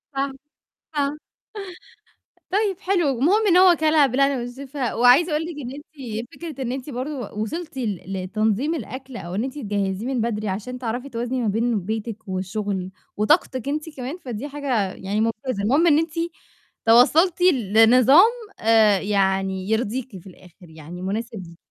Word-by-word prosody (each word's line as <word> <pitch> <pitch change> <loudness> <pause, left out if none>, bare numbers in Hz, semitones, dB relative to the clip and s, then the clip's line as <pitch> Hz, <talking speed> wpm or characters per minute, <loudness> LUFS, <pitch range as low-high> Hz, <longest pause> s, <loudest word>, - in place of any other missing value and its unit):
آه. 275 0 -1 0.6
آه. 290 0 0 1.3
طيب 395 -2 0
حلو، 365 -6 +1
المهم 405 - +3
إن 360 -2 +5
هو 365 -1 +7
كَلها 310 -2 +4
بالهنا 275 +2 +2
والشفا 260 +1 -4
وعايزة 250 +8 +5
أقول 305 +1 0
لِك 335 -1 -6
إن 250 -1 -6
أنتِ 265 -6 -7
فكرة 310 -6 -6
أنتِ 270 +2 -7
برضه 270 +2 -4
و 210 -2 -6
وصلتِ 310 +6 -5
ل 210 -8 -2 0.2
لتنظيم 215 - 0
الأكل 260 -1 -7
أو 175 -1 -6
إن 210 - 0
أنتِ 265 +1 -5
تجهّزيه 200 -3 -2
من 260 -3 -1
بدري 215 -2 -2
عشان 220 +6 -4
تعرفي 245 +3 -4
توازني 245 +1 -2
ما 230 - 0
بين 225 +2 +1
بيتِك 215 +2 -5
والشُغل 190 0 -3 0.3
وطاقتِك 260 - +1
أنتِ 300 +2 -3
كمان، 260 +6 -5
فدي 255 -5 -6
حاجة 265 -9 -1
يعني 200 +3 -2
مُمتازة 225 -1 -2
المهم 280 +11 +3
إن 300 -2 +5
أنتِ 325 0 -2 0.7
توصّلتِ 310 +11 +5
ل 255 - +2
لنظام 255 - +7 0.3
آآ 220 -3 +4
يعني 195 -1 0
يرضيكِ 225 0 -2
في 180 - -14
الآخِر، 180 -1 -16
يعني 160 +3 -10
مناسب 220 +5 -3
ليكِ. 170 0 -15
245 Hz, 160 wpm, -23 LUFS, 210-285 Hz, 1.3 s, هو